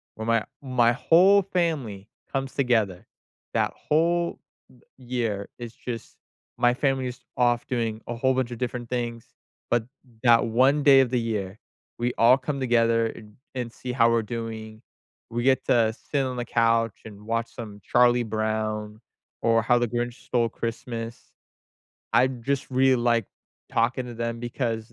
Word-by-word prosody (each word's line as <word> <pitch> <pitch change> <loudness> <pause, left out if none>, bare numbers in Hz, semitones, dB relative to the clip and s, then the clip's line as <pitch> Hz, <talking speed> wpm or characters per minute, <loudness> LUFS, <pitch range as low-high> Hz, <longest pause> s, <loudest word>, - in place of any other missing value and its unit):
where 110 - -6
my 115 -1 +3 0.2
my 125 -4 +3
whole 185 +8 +5
family 155 - -2 0.2
comes 135 -1 -2
together. 110 -9 +1 0.5
That - - +1
whole 170 +2 +1 0.6
year 120 -6 -3
is 120 -1 -7
just 115 -2 -7 0.4
my 120 0 +4
family 135 0 0
is 125 -1 -7 0.2
off 120 -1 +2
doing 115 -3 -2
a 120 - -3
whole 130 +3 +2
bunch 130 -2 -1
of 120 - -5
different 120 -1 -4
things, 120 -2 -3 0.4
but 120 -2 +1 0.4
that 120 -1 +5
1 130 +6 +3
day 140 -2 +8
of 130 - +1
the 125 - +1
year, 105 -3 -3 0.4
we 120 +1 -1
all 120 +3 +6
come 140 +1 -4
together 115 -2 +2
and 105 -2 -10 0.2
and 125 -3 -4
see 125 +2 -6
how 115 -2 +4
we're 115 0 +2
doing, 110 -1 -6 0.5
we 120 +1 -2
get 130 0 +3
to 115 -2 +3
sit 140 +3 -2
on 130 -1 -4
the 120 - -3
couch 115 -2 +1
and 105 -2 -11
watch 115 0 -2
some 105 -3 -9
Charlie 120 +1 +4
Brown 110 0 -2 0.4
or 115 0 +3
How 120 +2 +3
the 120 -1 0
Grinch 120 0 -2
Stole 120 -2 +1
Christmas. 115 0 -6 0.8
I 130 - +5
just 130 +2 -3
really 130 0 +4
like 120 -2 +2 0.5
talking 125 +3 +1
to 120 - -7
them 115 0 -3
because 115 -2 -3
120 Hz, 160 wpm, -25 LUFS, 115-130 Hz, 0.8 s, day